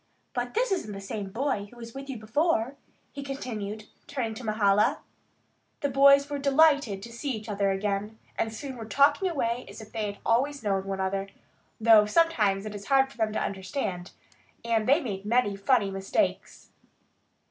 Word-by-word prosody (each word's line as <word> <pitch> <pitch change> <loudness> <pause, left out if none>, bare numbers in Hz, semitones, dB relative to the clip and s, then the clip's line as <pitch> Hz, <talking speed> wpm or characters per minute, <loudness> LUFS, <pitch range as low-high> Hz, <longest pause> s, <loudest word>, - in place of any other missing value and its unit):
But 245 0 -3
this - - +1
isn't 220 - -1
the 195 - -6
same 195 0 -5
boy 230 -1 -1
who 240 - -17
was 230 -1 -9
with 275 +1 -8
you 265 - -4
before," 250 +3 0 0.4
he 280 - -7
continued, 220 -6 -5 0.2
turning 250 -6 -3
to 220 - -9
Mahala. 210 -1 +3 0.8
The 285 - 0
boys 280 +1 +6
were 290 0 -3
delighted 280 -8 +3
to 235 - -9
see 275 +5 -4
each 215 -2 -7
other 200 -2 0
again, 200 +2 -2 0.2
and 225 - -1
soon 260 +3 -7
were 225 - -7
talking 290 - +3
away 245 -6 -1
as - - -10
if 220 -1 -11
they 220 -2 -2
had 200 - -14
always 270 +3 +1
known 195 -2 0
one 195 0 -3
another, 195 +1 -1 0.5
though 220 -2 +6
sometimes 215 -10 +2
it 215 - -5
was 200 -1 -8
hard 270 0 +3
for - - -17
them 220 -2 0
to - - 0
understand, 190 -2 -3 0.6
and 225 -1 +1
they 290 +5 +5
made 200 -8 -4
many 215 -1 +1
funny 200 0 +2
mistakes. 195 0 -2
225 Hz, 180 wpm, -27 LUFS, 205-275 Hz, 0.8 s, boys